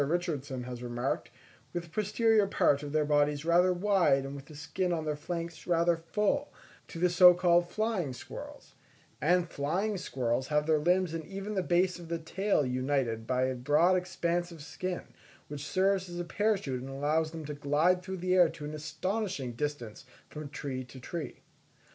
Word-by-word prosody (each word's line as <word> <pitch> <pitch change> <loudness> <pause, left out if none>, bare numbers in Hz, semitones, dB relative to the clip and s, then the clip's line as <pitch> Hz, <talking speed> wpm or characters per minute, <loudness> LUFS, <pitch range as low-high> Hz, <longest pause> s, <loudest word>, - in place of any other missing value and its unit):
Richardson 145 -5 -2
has 125 -1 -7
remarked, 120 +2 -2 0.4
with 175 -1 -2
the 170 - -14
posterior 215 +2 +2
part 145 -6 +2
of 145 -1 -6
their 155 0 +2
bodies 145 0 +2
rather 175 +2 +4
wide 180 -7 +3
and 135 - -6
with 140 -1 -9
the 150 - -13
skin 180 +5 -2
on 160 -2 -1
their 150 -1 -1
flanks 165 +1 -5
rather 170 0 +3
full, 170 +6 -1 0.4
to - - -9
the 180 +2 +3
so 180 0 +8
called 175 -1 +3
flying 215 -8 -1
squirrels; 125 - -10 0.5
and 175 +4 +3
flying 180 +9 -1
squirrels 130 -5 -1
have 150 0 +1
their 155 -1 +3
limbs 180 +2 +2
and 165 -1 -3
even 195 +2 -5
the 190 - +1
base 180 +1 +1
of 170 - -10
the 170 0 -2
tail 180 0 0
united 125 -3 -1
by 130 0 +1
a 130 0 +1
broad 150 +8 +3
expanse 175 -1 -1
of 160 -4 -10
skin, 180 +3 -4 0.5
which 145 -1 -6
serves 190 0 +1
as 175 0 -6
a - - -1
parachute 195 - 0
and 135 - -7
allows 150 +4 0
them 160 -1 -7
to 150 - -5
glide 150 +6 +2
through 190 +1 -5
the 180 +1 0
air 180 -3 +6
to 150 - -8
an 150 - -5
astonishing 160 - -3
distance 130 -2 -4 0.3
from 150 -1 -7
tree 135 -2 -4
to 125 +1 -12
tree. 160 +5 -6
165 Hz, 185 wpm, -30 LUFS, 145-180 Hz, 0.5 s, so